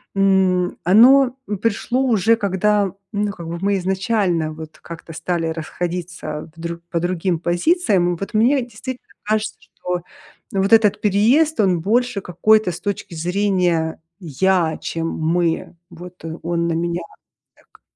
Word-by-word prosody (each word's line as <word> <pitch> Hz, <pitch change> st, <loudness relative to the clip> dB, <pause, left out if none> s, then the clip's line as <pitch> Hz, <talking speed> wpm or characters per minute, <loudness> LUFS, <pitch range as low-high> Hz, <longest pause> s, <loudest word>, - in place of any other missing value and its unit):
М, 190 Hz, -2 st, +2 dB
оно 250 Hz, +8 st, +6 dB, 0.3 s
пришло 230 Hz, +3 st, 0 dB
уже 230 Hz, -3 st, +3 dB
когда, 200 Hz, -1 st, +1 dB, 0.2 s
ну 205 Hz, 0 st, 0 dB
как 170 Hz, -4 st, -9 dB
бы 170 Hz, +1 st, -5 dB
мы 200 Hz, 0 st, +1 dB
изначально 190 Hz, -4 st, 0 dB
вот 155 Hz, 0 st, -10 dB
как-то 165 Hz, 0 st, -10 dB
стали 165 Hz, +1 st, -2 dB
расходиться 165 Hz, -1 st, -5 dB
в -, -, -17 dB
дру 170 Hz, 0 st, -5 dB
по 170 Hz, -, 0 dB
другим 175 Hz, 0 st, -1 dB
позициям. 175 Hz, -, +1 dB
Вот 195 Hz, -, -6 dB
мне 245 Hz, +6 st, +3 dB
действительно 245 Hz, +2 st, -8 dB, 0.2 s
кажется, 215 Hz, +1 st, -1 dB
что 180 Hz, 0 st, -5 dB, 0.5 s
вот 195 Hz, +2 st, +1 dB
этот 220 Hz, -3 st, +5 dB
переезд, 235 Hz, +10 st, +3 dB
он 185 Hz, -5 st, +3 dB
больше 235 Hz, +3 st, +1 dB
какой-то, 215 Hz, +3 st, +2 dB
с 170 Hz, -, -7 dB
точки 200 Hz, -3 st, -4 dB
зрения 175 Hz, -2 st, 0 dB, 0.2 s
я, 175 Hz, 0 st, +1 dB
чем 165 Hz, 0 st, -3 dB
мы 165 Hz, +2 st, -1 dB, 0.2 s
вот, 175 Hz, 0 st, -11 dB
э, 160 Hz, +1 st, -5 dB
он 170 Hz, 0 st, -1 dB
на 170 Hz, -, 0 dB
меня 170 Hz, +1 st, -1 dB, 0.5 s
так. -, -, -26 dB
185 Hz, 140 wpm, -20 LUFS, 170-210 Hz, 0.5 s, оно